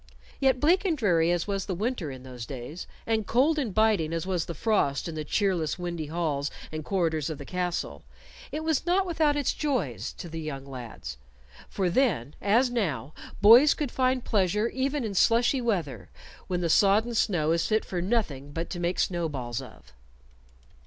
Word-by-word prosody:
Yet 265 -2 +3
bleak 340 +8 +3
and 345 -6 0
dreary 175 - +3
as 175 -1 0
was 195 -2 -3
the 190 - -2
winter 210 - -2
in 130 -1 -9
those 125 -3 -8
days, 140 +6 -7 0.2
and 220 -2 0
cold 290 +6 +3
and 250 -7 -1
biting 205 -6 +2
as 165 0 -2
was 180 -3 -1
the 170 - -6
frost 175 -9 +1
in 165 - -5
the 155 -1 -4
cheerless, 175 -1 0
windy 170 -3 -4
halls 150 -3 -1 0.2
and 155 0 -5
corridors 165 -4 0
of 155 - -4
the 140 - -9
castle, 180 - -3 0.5
it 305 +3 -3
was 315 -3 +1
not 375 +2 +3
without 315 -4 +2
its 290 -3 0
joys 285 -5 -2
to 180 - -8
the 165 0 -6
young 140 -3 -5
lads; 120 - -8 0.5
for 190 -2 -1
then, 175 - +1
as 235 +6 +3
now, 155 - -2 0.3
boys 240 +8 +8
could 290 -5 -3
find 255 -1 +1
pleasure 210 +2 +1
even 270 +2 -1
in 215 -3 -3
slushy 240 +6 +3
weather, 185 - -2 0.4
when 180 -1 -1
the 170 - +1
sodden 210 +6 +4
snow 175 -8 +1
is 165 0 +1
fit 215 0 +1
for 180 -2 -3
nothing 170 - -1
but 165 +3 -4
to 175 - -4
make 175 +1 -1
snowballs 145 -10 -2
of. 65 - -14
180 Hz, 185 wpm, -27 LUFS, 155-235 Hz, 0.5 s, boys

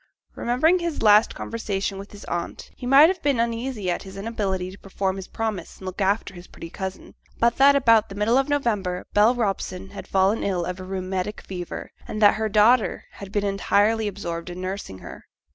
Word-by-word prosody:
Remembering 310 +10 +2
his 340 -6 -3
last 210 0 +5
conversation 200 -3 -3
with 200 - -10
his 205 - -11
aunt, 170 0 -5
he 245 - -7
might 275 +4 +8
have 370 -2 -2
been 280 -4 +1
uneasy 230 -4 -1
at - - -2
his 195 0 -10
inability 195 -4 -2
to 195 - -13
perform 190 -1 -2
his 190 - -7
promise 220 -6 -4
and 190 - -12
look 185 +2 -5
after 195 0 0
his 175 0 -12
pretty 165 - -10
cousin, 190 -1 -6 0.2
but 235 0 +2
that 280 +1 +6
about 230 -5 +4
the 195 - -8
middle 210 +4 +2
of 270 - -1
November 210 -11 -1
Bell 215 +4 +5
Robson 195 -4 -3
had 200 - -9
fallen 195 +3 +2
ill 180 -3 -1
of 180 +1 -5
a - - -6
rheumatic 190 +1 -3
fever, 180 -2 -7 0.2
and 215 - -4
that 205 -1 +7
her 220 0 -2
daughter 215 +3 +3
had 200 -1 -10
been 205 0 0
entirely 205 +2 +2
absorbed 175 -4 -5
in 175 +1 -7
nursing 185 - -5
her. - - -11
205 Hz, 200 wpm, -24 LUFS, 190-230 Hz, 0.2 s, might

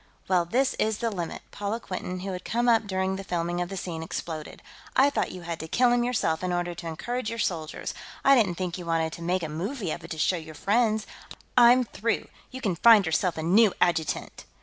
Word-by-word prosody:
"Well, 180 -2 +3
this 255 +9 +1
is 215 -1 +1
the 230 0 -1
limit!" 175 -5 -5
Paula 205 +3 -3
Quinton, 185 -3 -5
who 195 +1 -4
had 180 -1 -5
come 240 +2 0
up 225 -3 +4
during 190 0 -1
the 195 - -6
filming 175 -1 -2
of 175 - -3
the 195 - -5
scene, 170 -3 -4
exploded. 160 -1 -6 0.3
"I 280 +2 +5
thought - - -1
you 180 - -9
had 170 -1 -4
to 160 - -6
kill 245 +8 +3
him 240 0 +3
yourself 220 -10 0
in 180 - -1
order 175 0 -1
to 170 0 -8
encourage 240 +9 -3
your 230 - -4
soldiers; 160 -7 -3 0.3
I 275 - +8
didn't 210 -9 +3
think 180 0 -3
you 175 - -7
wanted 165 -1 0
to - - -8
make 180 +1 0
a - - -1
movie 185 - -3
of 170 - -5
it 165 - -9
to 160 - -5
show 180 +4 +2
your 160 -1 -9
friends. 220 +3 +1 0.5
I'm 245 +1 +7
through; 230 0 -2 0.2
you 260 0 -8
can 195 -7 0
find 220 -2 +7
yourself 160 +2 0
a 160 - -3
new 200 +5 +4
adjutant!" 160 -3 0
185 Hz, 230 wpm, -27 LUFS, 170-225 Hz, 0.5 s, I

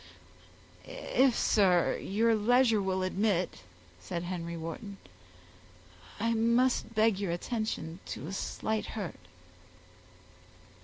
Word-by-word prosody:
"If, 260 -2 +1
sir, 185 -5 +3
your 225 +4 +2
leisure 230 0 +3
will 190 -1 -1
admit," 185 - 0 0.4
said 90 - -4
Henry 170 -1 -4
Wharton, 180 +5 -6 1.2
"I 230 0 +1
must 235 +1 +2
beg 215 -2 +3
your 195 -4 -1
attention 175 -3 -3
to 115 - -6
a 180 - -6
slight 215 +2 -2
hurt." 170 - -6
200 Hz, 100 wpm, -30 LUFS, 175-225 Hz, 1.2 s, sir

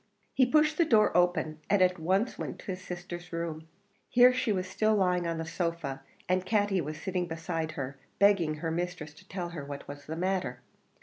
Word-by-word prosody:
He 260 - +4
pushed 305 +3 +3
the - - +7
door 220 -9 +4
open, 175 -3 +2
and 205 0 +4
at 180 -1 +3
once 190 +9 +1
went - - -3
into 195 - -7
his 185 0 -6
sister's 175 -1 -7
room. 165 -1 -4 0.4
Here 250 +1 +7
she 255 -3 0
was 185 -2 -1
still 215 +3 +2
lying 180 -3 +2
on 165 -1 -1
the 165 - -3
sofa, 165 -5 -3 0.3
and 185 0 +2
Katty 205 -1 +1
was 155 0 -5
sitting 180 -2 -2
beside 165 -1 -3
her 140 -1 -5 0.2
begging 195 -6 +4
her 160 +1 -3
mistress 170 -2 -3
to 155 - -18
tell 180 -2 -4
her 165 -4 -6
what 140 0 -7
was 145 0 -9
the 160 - -4
matter. 180 -9 -1
180 Hz, 200 wpm, -30 LUFS, 160-195 Hz, 0.4 s, the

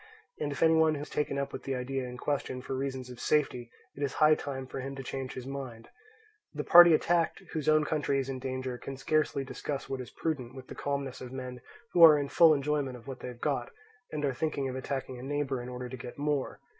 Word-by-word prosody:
And 145 -1 -2
if 140 - -1
any 165 0 +6
one 160 -1 +4
has 145 +1 -6
taken 150 -2 -1
up 140 0 -2
with - - -5
the 135 - -3
idea 130 +1 -3
in 125 0 -7
question 130 -2 -2
for 135 - -4
reasons 130 -1 -4
of 125 - -10
safety, 125 -5 +1 0.3
it 140 - -9
is 140 -2 -1
high 155 0 +5
time 135 -3 -3
for 130 - -6
him 135 +1 -5
to 135 - -6
change 135 0 -5
his 130 - -7
mind. 130 -4 -7 0.7
The 150 - -2
party 175 0 +9
attacked, 170 +3 +1
whose 155 -2 0
own 155 0 +4
country 150 -3 0
is 135 -1 -1
in 135 -1 -4
danger, 130 -1 -4
can 135 - -7
scarcely 150 0 +1
discuss 140 +1 -5
what 135 -1 -3
is 125 - -8
prudent 130 -6 -3
with 130 -1 -9
the - - -6
calmness 140 -2 -3
of 125 -1 -7
men 130 -1 -6 0.3
who 170 - +6
are 155 -2 +10
in 140 -1 -2
full 165 +1 +7
enjoyment 140 -3 0
of 115 - -16
what 135 -2 -7
they - - -7
have 125 -1 -9
got, - - -1 0.4
and 150 -1 -2
are 135 - 0
thinking 140 0 -1
of 130 - -4
attacking 130 -1 -4
a - - -8
neighbour 135 -1 -2
in 120 - -7
order 125 0 -5
to 130 +1 -7
get 120 0 -9
more. 145 -1 -1
135 Hz, 245 wpm, -30 LUFS, 130-150 Hz, 0.7 s, are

